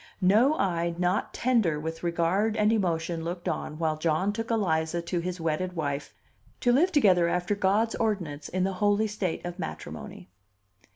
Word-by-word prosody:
No 225 +11 +5
eye 170 - 0
not 180 +3 0
tender 225 -12 +1
with 160 +1 -5
regard 175 +6 +1
and 210 +1 +3
emotion 170 -5 -1
looked 175 +1 -5
on 155 - -3
while 155 -1 -1
John 165 +5 +1
took 225 +1 -4
Eliza 170 -7 0
to 175 +1 -2
his 180 +1 -4
wedded 165 +3 -1
wife, 145 -3 -3 0.5
to 245 - +3
live 325 +10 +4
together 190 - +4
after 180 +3 0
God's 205 +3 +1
ordinance 175 -10 -2
in 185 0 -1
the 195 +1 0
holy 205 +1 +3
state 200 -6 -3
of 175 +1 -6
matrimony. 90 - -7
180 Hz, 165 wpm, -27 LUFS, 165-210 Hz, 0.5 s, No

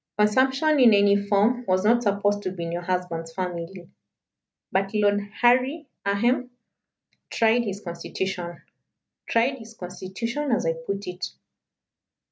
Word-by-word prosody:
Consumption 265 +8 +3
in 235 -5 +7
any 200 0 +5
form 205 +4 +2
was 185 +1 +2
not 235 +2 +4
supposed 205 -1 +1
to 185 - -3
be 175 -2 -6
in 170 - -4
your 175 +1 -3
husband's 175 -2 -3
family. 180 0 -5 0.8
But 195 +2 0
Lord 205 -1 +3 0.2
Harry 255 +6 +3 0.2
ahem! 240 +5 +1 0.8
tried 230 +1 +2
his 200 -1 -4
constitution 175 0 -5 0.6
tried 255 +4 +1
his 225 0 -12
constitition, 230 +10 -4
as 225 - +1
I 165 - +2
put 195 +5 -5
it." 180 0 -4
200 Hz, 130 wpm, -25 LUFS, 180-235 Hz, 0.8 s, in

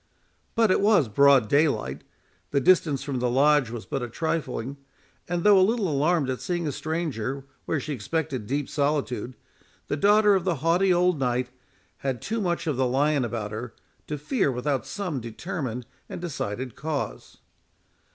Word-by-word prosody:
But 225 -4 +4
it - - +3
was 200 - +4
broad 135 +1 +5
daylight, 140 - +1 0.5
the 140 - +2
distance 150 -3 +3
from 135 -3 -3
the 125 0 +1
Lodge 140 0 +4
was 115 -1 -6
but 125 -4 -4
trifling, 145 -4 -2 0.5
and 175 -1 -1
though 205 -2 +7
a - - +5
little 215 +1 +2
alarmed 155 0 +1
at 130 - -4
seeing 175 -2 -2
a - - -1
stranger 140 -5 -3 0.2
where 160 - 0
she 150 +2 -4
expected 130 -1 -3
deep 140 +2 -1
solitude, 140 -5 -1 0.5
the 145 - 0
daughter 210 +4 +5
of 190 -3 +2
the 180 -2 +1
haughty 180 +3 +4
old 180 -2 +3
Knight 125 -1 0 0.5
had 135 -3 -3
too 225 - -3
much 175 -3 -1
of 150 -5 -1
the 130 -1 +2
lion 140 +2 +2
about 110 -3 -3
her, 110 +1 -6 0.3
to 150 - -3
fear 150 - 0
without 130 0 -2
some 180 -9 -3
determined 125 - -5 0.2
and - - -6
decided 130 - -4
cause. 150 -2 -4
145 Hz, 165 wpm, -26 LUFS, 125-175 Hz, 0.5 s, though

